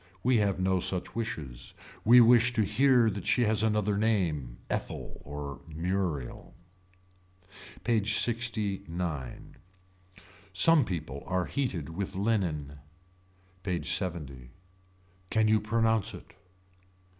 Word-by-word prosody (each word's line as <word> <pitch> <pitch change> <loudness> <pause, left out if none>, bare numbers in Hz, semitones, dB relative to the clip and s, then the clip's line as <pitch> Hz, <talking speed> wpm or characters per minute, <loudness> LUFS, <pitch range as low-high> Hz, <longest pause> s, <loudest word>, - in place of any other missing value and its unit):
We 125 0 +3
have 100 -3 +1
no 95 0 +1
such 90 0 -2
wishes. 75 - -5 0.3
We 120 +3 +8
wish 120 +1 +5
to 110 -3 +2
hear 125 +2 +4
that 100 -1 -6
she 125 - +3
has 110 -2 +2
another 105 -2 +1
name, 80 - 0
Ethel - - -5
or 75 0 -7
Muriel. 80 -4 -3 1.3
PAGE 110 -3 +1
LXIX. 100 - -2 0.9
Some 155 - +5
people 75 -7 -5
are 90 -1 0
heated 100 - -3
with 90 +4 -5
linen. 85 -9 -1 0.8
PAGE 85 -5 -3
LXX. 80 -9 -1 0.8
Can 110 -1 +2
you 110 0 +3
pronounce 110 -1 +1
it. - - -14
95 Hz, 110 wpm, -29 LUFS, 80-110 Hz, 1.3 s, We